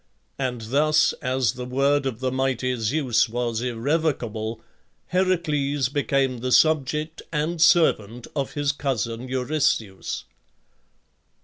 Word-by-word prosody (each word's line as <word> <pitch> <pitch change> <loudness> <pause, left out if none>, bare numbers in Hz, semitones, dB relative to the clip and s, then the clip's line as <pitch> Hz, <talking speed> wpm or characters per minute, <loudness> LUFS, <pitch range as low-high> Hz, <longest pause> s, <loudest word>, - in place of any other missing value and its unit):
And 125 -3 -2
thus, 150 +7 +3
as 130 -3 +1
the 125 +2 -7
word 135 +2 +1
of 125 -2 -5
the 130 -1 0
mighty 130 -1 0
Zeus 120 +1 +1
was 120 -1 -2
irrevocable, 120 -3 -1 0.5
Heracles 150 -7 +1
became 135 -2 0
the 125 +2 -3
subject 155 +1 +2
and 160 +2 -1
servant 125 - +3
of 140 -3 -2
his 145 -1 0
cousin 125 -4 -3
Eurystheus. 130 -6 -1
130 Hz, 110 wpm, -24 LUFS, 120-150 Hz, 0.5 s, thus